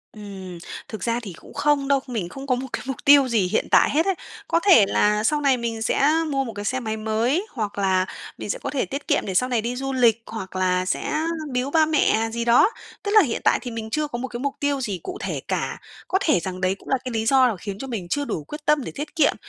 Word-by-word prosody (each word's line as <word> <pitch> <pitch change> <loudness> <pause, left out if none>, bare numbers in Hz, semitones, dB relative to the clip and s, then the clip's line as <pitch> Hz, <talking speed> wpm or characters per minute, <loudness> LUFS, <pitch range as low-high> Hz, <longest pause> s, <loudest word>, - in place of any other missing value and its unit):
Ừm, 190 -4 -8 0.3
thực 215 - -7
ra 235 0 0
thì 200 -7 -8
cũng - - -15
không 290 -2 +1
đâu, 280 -1 +3
mình 215 -8 -3
không 275 +5 -9
có 255 - +3
một 260 +2 -5
cái - - -3
mục 265 - -3
tiêu 280 -2 +7
gì 220 -6 +2
hiện - - 0
tại - - +6
hết 315 +5 +2
ấy. 385 -2 +1 0.3
Có 335 - +2
thể 220 - +8
là 210 +1 +2
sau 295 +5 +2
này 270 -3 +3
mình 230 -1 -3
sẽ 275 +4 +2 0.2
mua 275 -1 0
một 230 - -6
cái 205 0 -6
xe 260 +2 0
máy 220 -2 -3
mới, 225 - 0
hoặc 210 -5 -4
là 190 -1 +2 0.3
mình - - -7
sẽ - - -2
có - - -4
thể 280 - -1
tiết 280 +2 -6
kiệm - - +1
để 190 - -3
sau 250 +7 +2
này 240 -3 +1
đi 240 +3 -3
du 270 +1 -3
lịch 235 -3 +3
hoặc 190 -4 -7
là 185 0 +1
sẽ - - -2 0.4
biếu 255 +3 -1
ba 315 -1 +4
mẹ 225 -7 +2
gì 235 +1 -2
đó. 240 - +6 0.3
Tức 405 - -2
là 430 0 +8
hiện 250 -9 -1
tại - - +4
thì 245 - -6
mình 225 -1 -5
chưa 305 +5 -1
có 240 - -5
một 260 - -3
cái 240 - -6
mục 275 +1 -2
tiêu 285 -2 0
gì 200 -7 -3
cụ 370 +1 -5
thể - - -3
cả. - - -2 0.3
Có 380 - +2
thể 305 - +3
rằng 185 +2 -5
đấy 185 0 +1
cũng - - -15
là 265 - +3
cái 255 - -4
lý 225 -1 -1
do 255 -3 +4
khiến 195 +2 -6
cho 270 - -5
mình 205 -8 -4
chưa 290 +9 -1
đủ 155 - -3
quyết 300 - -9
tâm 300 -3 +3
để - - -6
tiết 295 +4 -6
kiệm. 310 -3 +3
240 Hz, 275 wpm, -23 LUFS, 210-280 Hz, 0.4 s, thể